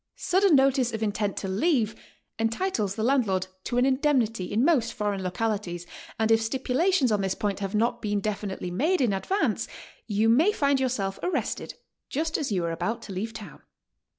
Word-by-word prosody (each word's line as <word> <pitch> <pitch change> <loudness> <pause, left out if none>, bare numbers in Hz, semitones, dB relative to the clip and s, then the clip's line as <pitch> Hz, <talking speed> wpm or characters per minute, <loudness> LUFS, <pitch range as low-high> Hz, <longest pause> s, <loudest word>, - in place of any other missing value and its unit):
.Sudden 375 -2 +3
notice 270 -2 +3
of 220 0 -2
intent 205 -1 -1
to 195 - -3
leave 220 - +1 0.4
entitles 225 - 0
the 220 - -2
landlord 220 -8 +2 0.2
to 245 - -2
an 250 - +4
indemnity 260 - +1
in 225 +6 +2
most 250 -9 +2
foreign 205 -2 -1
localities, 185 -2 -2 0.3
and 220 0 +1
if 225 0 +5
stipulations 265 +5 +1
on 210 -2 +2
this 190 -1 -1
point 205 -2 -2
have 195 0 -3
not 230 +3 +1
been 205 -2 0
definitely 200 -3 -3
made 315 - +1
in 240 -6 +2
advance, 375 - 0 0.4
you 215 0 +2
may 295 - +5
find 280 -7 +2
yourself 215 -7 -1
arrested 360 - -2 0.3
just 315 +3 -2
as 290 -7 -1
you 180 -4 0
are 165 - -1
about 230 +8 -3
to 200 - -7
leave 210 +5 -3
town. - - -10
225 Hz, 180 wpm, -26 LUFS, 200-270 Hz, 0.4 s, if